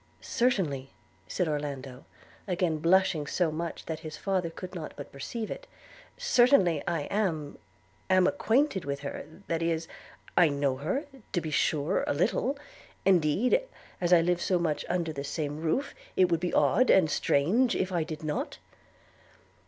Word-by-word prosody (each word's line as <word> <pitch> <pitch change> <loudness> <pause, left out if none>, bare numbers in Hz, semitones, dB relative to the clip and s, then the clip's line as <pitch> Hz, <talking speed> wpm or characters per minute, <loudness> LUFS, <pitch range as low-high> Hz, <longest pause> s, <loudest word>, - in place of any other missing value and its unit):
'Certainly,' 165 - 0 0.4
said 180 - -1
Orlando, 140 -4 -4 0.4
again 175 -4 0
blushing 165 -2 +3
so 170 0 +1
much 165 +1 -5
that 160 -1 -4
his 155 -1 -8
father 185 -4 -1
could 180 +2 -8
not 165 -4 -6
but 145 - -8
perceive 215 - -5
it - - -7 0.3
– - - -22
'certainly 245 - +4
I 170 -3 0
am 160 -5 -2 0.2
– 95 0 -35
am 185 - +5
acquainted 230 - +2
with 140 -1 -4
her; 140 - -6 0.2
that 165 0 -1
is 165 -1 -1 0.3
– - - -26
I 175 -3 +6
know 140 -2 0
her, 190 - -2 0.3
to 175 - +2
be 160 -2 -5
sure, 150 +4 +1
a - - 0
little; 240 - +1 0.2
– - - -26
indeed, 190 - +3 0.4
as 175 0 +1
I 175 -2 +7
live 175 +1 +1
so 185 - +2
much 165 -3 -1
under 170 -3 -1
the 140 -1 -5
same 145 +1 -3
roof, 165 - -1 0.2
it 185 -2 +4
would 170 - +3
be 180 +1 -2
odd, 255 - +3
and 185 -4 +6
strange, 185 - +2
if 190 - -1
I 170 -3 +1
did 155 -1 -7
not.' 150 -1 -3
165 Hz, 170 wpm, -29 LUFS, 150-190 Hz, 0.4 s, I